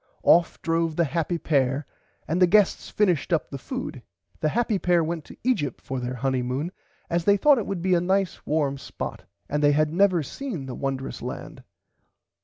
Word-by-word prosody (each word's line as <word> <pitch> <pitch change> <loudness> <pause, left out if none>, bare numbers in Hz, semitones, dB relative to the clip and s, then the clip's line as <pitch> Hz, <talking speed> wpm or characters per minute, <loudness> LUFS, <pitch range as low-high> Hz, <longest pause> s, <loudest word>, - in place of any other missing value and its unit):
Off 170 0 +4
drove 165 -1 0
the 170 - +3
happy 165 +3 -1
pair 140 -3 +1 0.4
and 165 +6 0
the 180 - +7
guests 205 +2 +3
finished 185 -6 +1
up 165 -3 0
the 140 - -4
food. 255 - -5 0.4
The 155 - +1
happy 225 0 0
pair 175 -2 +3
went 160 -1 -3
to - - -13
Egypt 200 - 0
for 130 0 -4
there 125 +1 -3
Honymoon 130 +5 -1 0.4
as 170 0 -1
they 200 0 +5
thought 285 +4 +5
it 215 - -4
would 185 -4 -3
be 185 0 +2
a 170 - +3
nice 190 0 0
warm 145 -3 0
spot - - -6 0.2
and 150 +1 -1
they 145 0 +5
had 155 +1 +2
never 185 -3 +3
seen 190 - -5
the 130 - -6
wondrous 135 0 -4
land. - - -7
165 Hz, 190 wpm, -25 LUFS, 140-185 Hz, 0.4 s, the